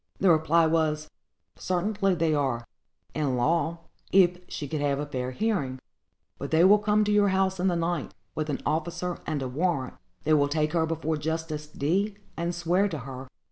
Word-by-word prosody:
The 190 -2 +5
reply 160 +1 +4
was, 155 -1 0 0.5
"Certainly 195 +1 0
they 165 -2 +1
are, 130 -5 0 0.5
in 145 -4 0
law, 165 +5 +1 0.3
if 180 -2 +5
she 145 - -5
could 150 +1 -3
have 140 -1 +1
a 145 - -2
fair 130 -3 -3
hearing; 140 - -1 0.6
but - - -4
they 160 +1 +4
will 205 +3 +7
come 210 0 +2
to 210 - 0
your 205 -1 +4
house 190 0 +1
in 185 - +2
the 180 - +2
night, 170 - -1 0.2
with 155 +7 -3
an 145 - -3
officer 170 +3 -2
and 150 -3 -1
a - - -2
warrant; 140 0 -1 0.3
they 155 - +2
will 145 -2 +3
take 155 +1 0
her 160 -2 +2
before 160 -1 -1
Justice 155 0 -3
D——, 190 +8 -1 0.2
and 170 +1 -2
swear 175 +4 +2
to 165 - -4
her. 130 0 -8
160 Hz, 185 wpm, -27 LUFS, 145-180 Hz, 0.6 s, will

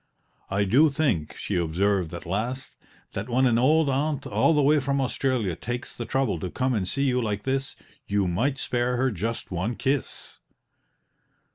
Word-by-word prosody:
"I 100 +1 +1
do 135 +11 +5
think," 135 - -1
she 100 - -2
observed 90 +1 +1
at 85 - -8
last, 115 +9 -3 0.4
"that 100 +5 -5
when 130 +2 +3
an 115 -2 +3
old 155 +4 +4
aunt 140 +1 0
all 165 - +2
the 145 - +3
way 150 +2 +5
from 140 0 0
Australia 125 -7 0
takes 120 - -5
the 120 - -5
trouble 130 -9 0
to 90 - -4
come 130 +7 0
and 100 -5 -1
see 140 +8 0
you 125 -2 +2
like 105 -3 -2
this, 135 0 -2 0.3
you 100 -2 +1
might 125 +11 0
spare 125 -1 -1
her 130 +1 +2
just 110 +3 -4
one 95 +7 -2
kiss!" 135 0 -3
125 Hz, 175 wpm, -26 LUFS, 100-135 Hz, 0.4 s, do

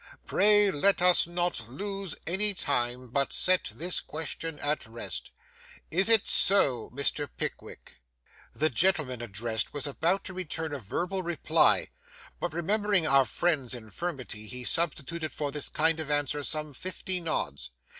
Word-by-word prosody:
Pray 205 -1 +5
let 195 +6 +2
us 180 -1 +5
not 175 -9 -3
lose 195 +4 -5
any 200 +4 +5
time, 125 -5 -1
but 140 +3 0
set 185 0 +2
this 175 +2 0
question 160 0 -6
at 145 -4 -2
rest. 110 -6 -6 0.6
Is 190 +6 +2
it 225 -3 +6
so, 140 - +3
Mr. 140 +2 -2
Pickwick?' - - -7 0.5
The 155 +1 0
gentleman 145 -5 +1
addressed 110 +1 -3
was 145 - -2
about 165 +7 0
to 190 - -6
return 160 -3 -5
a 145 - -4
verbal 180 - -3
reply, 175 -3 +3 0.5
but - - -3
remembering 200 +2 +1
our 135 -3 +4
friend's 135 0 -1
infirmity, 120 - -6
he 125 +2 -7
substituted 160 +2 0
for 145 -2 -3
this 150 0 -1
kind 160 +1 +1
of 155 -2 -5
answer 145 0 0
some 150 0 -2
fifty 185 +4 -2
nods. 70 - -3
155 Hz, 145 wpm, -28 LUFS, 130-180 Hz, 0.6 s, it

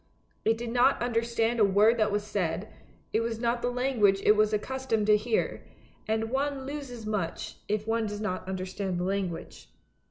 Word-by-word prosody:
It 225 0 +2
did 235 0 -4
not 250 +3 +4
understand 235 0 0
a - - +6
word 210 +4 +4
that 215 -1 +2
was 205 0 0
said; 195 -2 -2 0.4
it 220 - +3
was 230 0 -2
not 235 +1 0
the 245 - 0
language 245 -6 +2
it 210 - +6
was 215 0 +3
accustomed 225 0 -1
to 210 0 +6
hear, 220 +2 -1 0.4
and 220 +1 -1
one 275 0 -1
loses 270 -5 -6
much 205 -6 -3
if 210 0 -1
one 225 0 0
does 205 0 -5
not 185 -3 -3
understand 190 0 -3
the 175 - -1
language. 185 - -3
220 Hz, 180 wpm, -28 LUFS, 205-240 Hz, 0.4 s, a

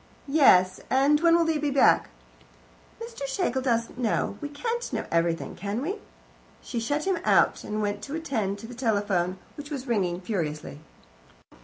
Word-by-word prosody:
"Yes. 185 -12 +5
And 275 +3 +4
when 335 0 +5
will 340 -1 +3
they 320 -2 +1
be 295 0 0
back?" 275 -1 +4 0.9
"Mr. 460 -12 -6
Schlegel 270 -3 -1
doesn't 235 -1 -1
know. 225 -4 0
We 290 - -4
can't 470 +10 -3
know - - -2
everything, 165 0 0
can 200 +4 -3
we?" 360 - -3 0.6
She 240 - -4
shut 290 +7 -1
him 380 -2 +1
out, - - +3
and 215 0 -3
went 205 0 -2
to 285 - -5
attend 225 -12 -2
to 225 - -9
the 245 - -9
telephone, 205 -7 0 0.2
which 290 0 -8
was 275 -4 -5
ringing 190 -8 0
furiously. 155 -7 -4
245 Hz, 165 wpm, -26 LUFS, 200-295 Hz, 0.9 s, Yes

